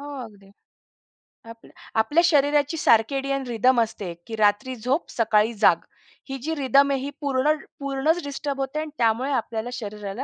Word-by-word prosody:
हो 285 0 -8
अगदी. 200 -3 -16 1.0
आपल्या, 230 0 -16 0.3
आपल्या 295 +10 +3
शरीराची 290 0 +2
सर्केडियन 275 +3 +2
रिदम 240 +1 +3
असते 205 -5 -3
की 225 - -5
रात्री 215 +5 +1
झोप 250 +7 -2
सकाळी 225 0 +2
जाग. - - +6 0.5
ही 270 - -4
जी 320 +2 -2
रिदम 280 0 +3
आहे 270 - 0
ही 280 - -4
पूर्ण 280 +2 +2 0.3
पूर्णच 280 +4 0
डिस्टर्ब 280 0 -4
होते 270 +3 -2
आणि 310 0 -4
त्यामुळे 235 +4 +1
आपल्याला 230 -2 -2
शरीराला 210 +1 -6
265 Hz, 150 wpm, -24 LUFS, 225-285 Hz, 1.0 s, जाग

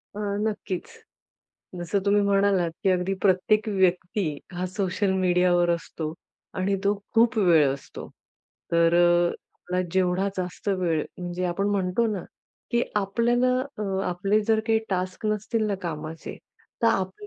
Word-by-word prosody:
अ, - - -5 0.2
नक्कीच. 205 -4 -3 0.9
जसं 175 +3 -1
तुम्ही 205 0 +4
म्हणालात, 200 -3 +2
की 190 - +3
अगदी 185 +1 +1
प्रत्येक 210 +3 +3
व्यक्ती, 185 0 +1 0.3
हा 180 +1 -2
सोशल 190 +1 -1
मीडियावर 180 -1 +3
असतो 165 -2 -3 0.5
आणि 195 +2 +1
तो 200 +1 +3 0.2
खूप 230 +1 +4
वेळ 170 -7 +5
असतो. 140 - -10 0.6
तर 170 0 +4
अ, 175 0 +4 0.2
आपला 180 +1 -3
जेवढा 185 +1 +1
जास्त 180 +2 -4
वेळ 175 -5 +1
म्हणजे 180 0 -3
आपण 180 +3 -1
म्हणतो 195 +3 +1
ना, 195 -4 -4 0.5
की 235 -1 +2
आपल्याला 235 +5 +2 0.3
अ, - - -2 0.3
आपले 195 +4 +1
जर 220 0 +3
काही 225 -1 +3
टास्क 185 +2 -2
नसतील 215 +1 0
ना 205 - 0
कामाचे, 160 -1 -6 0.5
तर - - +5
आपलं 195 - -2
185 Hz, 140 wpm, -25 LUFS, 175-205 Hz, 0.9 s, वेळ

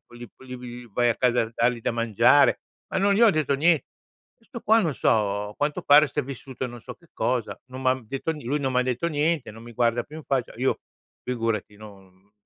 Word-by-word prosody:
li 120 -1 -10 0.3
li 120 -1 -9
v 105 - -23
vai 120 +2 +2
a - - -1
casa 125 -2 +2
a 115 - -6
dargli 120 0 +1
da - - -1
mangiare", 115 -3 +4 0.3
ma - - -1
non 200 +1 +3
gli 210 - +1
ho 225 - +8
detto 155 -4 0
nie 165 +1 +3 0.6
questo 235 0 -9
qua, 225 +2 +4
non 165 -7 0
so, 105 -2 +1
a - - -14
quanto 145 0 -1
pare 145 +1 +6
si - - -8
è - - -5
vissuto 130 -1 -6
non 120 -1 -10
so - - -9
che 170 - -24
cosa, 125 -3 -1
non 130 0 -9
m'ha 130 0 +3
detto 135 +8 -3
nie 150 -6 -10
lui 145 +4 0
non 135 -2 -1
m'ha 125 0 +2
detto 125 +5 -1
niente, 150 -4 0
non 115 +2 -12
mi 120 - -11
guarda 120 0 +1
più 150 - -12
in 155 - -11
faccia. 130 -3 -1
Io, 130 +2 0 0.4
figurati 115 -4 -2
no 100 -2 -16
125 Hz, 230 wpm, -25 LUFS, 115-145 Hz, 0.6 s, ho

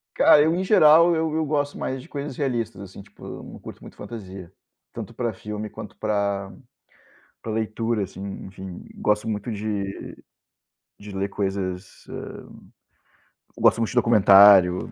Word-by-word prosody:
Cara, 150 - +6
eu, 160 +2 +2
em 185 - -1
geral 170 -3 +6
eu 160 -1 -1
eu 160 - +1
gosto 145 -1 -1
mais 130 0 -3
de - - -15
coisas 140 -2 -6
realistas, 115 -7 -2
assim, 100 0 -10
tipo, 100 - -14 0.2
não - - -11
curto - - -11
muito - - -13
fantasia, 95 -5 -9 0.4
tanto - - -8
pra 120 -3 -2
filme 105 +1 -6
quanto - - -10
para 100 -2 -2 0.9
para 110 - -5
leitura, 110 0 -1
assim, 95 0 -9 0.2
enfim, 95 -1 -9
gosto 105 +1 0
muito 110 +2 -3
de 100 -2 -5 0.9
de 105 0 -10
ler 95 +1 -2
coisas 95 -2 -4
hã, - - -8 1.2
gosto - - +4
muito 115 - 0
de - - -9
documentário, 100 -5 +6
105 Hz, 150 wpm, -23 LUFS, 100-125 Hz, 1.2 s, Cara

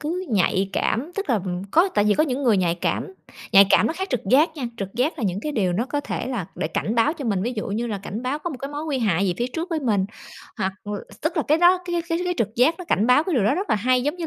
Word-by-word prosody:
cứ 345 +5 -3
nhạy 195 -1 +1
cảm, 285 +10 -1
tức 400 0 -3
là, - - +4
ừm, 180 -1 -3
có 340 - +4
tại 205 - +3
vì 210 -1 +3
có 310 - +3
những 275 -2 -2
người 235 -6 +4
nhạy 175 -3 +1
cảm, 180 +2 -2 0.4
nhạy 195 0 +8
cảm - - +5
nó - - 0
khác 380 +4 -4
trực 250 - 0
giác 295 +6 +5
nha. 270 - -4
Trực 195 -3 -6
giác 265 +7 0
là 240 - -2
những 190 0 -1
cái 300 - -3
điều 195 -8 +1
nó 225 +8 -1
có 290 +1 -2
thể 285 - -4
là 225 -10 -3
để 155 - -2
cảnh 210 +6 -2
báo 235 +6 +3
cho 300 -5 -7
mình, 200 -5 0
ví 240 +4 -1
dụ 210 - -3
như 220 +4 -2
là 210 -4 -3
cảnh 200 +4 -6
báo 260 +3 -2
có 345 +3 -4
một 285 - -6
cái 275 +2 -6
mối 295 +1 -5
nguy 295 -4 -1
hại 200 -5 +1
gì 180 - 0
phía 240 - 0
trước 335 +3 -4
với 325 -2 -1
mình 210 -8 +1 0.5
hoặc 190 -2 -1
l 205 - -6 0.3
tức 325 +3 -1
là 315 - +2
cái 305 +2 +4
đó, 355 +2 +5
cái 345 -1 -1
cái 330 -1 0
cái 360 0 -1
trực 220 -1 -1
giác 255 +7 +4
nó 360 - -7
cảnh 220 - +1
báo 250 +5 +5
cái 360 - -1
điều 235 -7 +2
đó 235 - +3
rất 385 +5 -3
là - - +4
hay, 250 +4 +2
giống 295 +6 -1
như 340 -2 -4
250 Hz, 315 wpm, -23 LUFS, 205-315 Hz, 0.5 s, nhạy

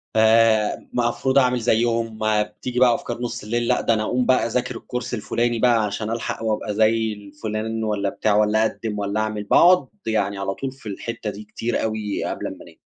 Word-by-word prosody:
آآ 110 -1 +4 0.2
مفروض 120 +2 +1
أعمل 125 -1 +2
زيّهم 115 -1 0
بتيجي 110 +3 -1
بقى 125 -2 +5
أفكار 120 0 -5
نُص 120 - -4
الليل 120 +2 -1
لأ، 125 - +2
ده - - +2
أنا 110 -1 0
أقوم 125 +3 0
بقى 130 -3 +3
أذاكر 125 +1 -2
الكورس 125 +1 -5
الفُلاني 120 +1 -1
بقى 120 -2 +4
عشان 105 +1 -3
ألحق 115 0 -3
وابقى 110 -1 -1
زي 110 +1 +2
الفُلان 110 +1 -5
والّا 105 -2 0
بتاع، 105 +1 0
والّا 105 +1 +3
أقدِّم 110 -1 -3
والّا 100 +1 -1
أعمل؟ 110 -1 -2
باقعد 180 - +5 0.2
يعني 100 -3 0
على 95 0 -2
طول 135 +6 -5
في 130 -4 -10
الحتّة 115 +2 -5
دي 105 +1 -7
كتير 115 +3 -3
أوي 110 -2 -2
قبل - - -3
أمّا - - -6
أنام. - - -16
110 Hz, 190 wpm, -22 LUFS, 105-120 Hz, 0.2 s, بقى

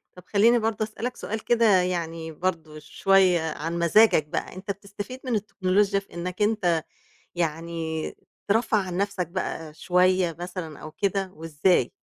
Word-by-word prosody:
طَب 180 - -13
خلّيني 230 +4 +4
برضه 220 -1 0
أسألك 230 +3 -5
سؤال 220 +1 -4
كده 235 -1 +3 0.2
يعني 165 -2 -3
برضه 160 -2 -3
شوية 185 +3 +3
عن 165 +3 -3
مزاجك 170 -1 +5
بقى، 155 - -4
أنت 195 +2 -4
بتستفيد 200 +6 -8
من 245 -3 0
التكنولوجيا 200 -1 +1
في 195 - -18
إنّك 180 +3 -5
أنت 185 -7 +2 0.5
يعني 165 -1 -3 0.3
ترفّه 220 +1 +2
عن 185 -3 -2
نَفْسك 200 -3 -1
بقى 165 -3 -4
شوية 180 0 +2
مثلًا 175 -4 -6
أو 155 - -9
كده 195 +2 -1
وإزاي؟ 160 -3 +1
185 Hz, 145 wpm, -25 LUFS, 165-205 Hz, 0.5 s, مزاجك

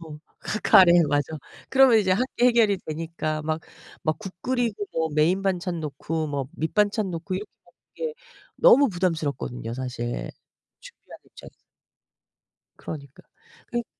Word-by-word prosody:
어 155 -2 -10 0.2
크 215 - -4
카레. 180 -2 +7 0.2
맞아. 145 +1 0 0.4
그러면 265 -4 +6
이제 190 -3 +2
함께 245 +4 0
해결이 225 -5 +4
되니까 155 -1 -3
막 155 +1 -2 0.4
막 155 -1 +1
국 195 -3 -7
끓이고 235 -5 -1
뭐 160 0 0
메인 170 +6 +2
반찬 180 -3 -1
놓고 155 +1 -3
뭐 140 -2 -3
밑반찬 205 +4 0
놓고 175 +2 -4
이렇게 205 +3 -5 0.2
먹는 - - -27 0.4
게 - - -23 0.4
너무 290 - +6
부담스럽거든요 155 - -2
사실 125 -2 -4 0.5
준비하는 - - -15
입장에서. - - -14 1.2
그러니까. 140 -3 -9 0.4
그니 240 -1 -3
170 Hz, 295 characters per minute, -25 LUFS, 155-210 Hz, 1.2 s, 카레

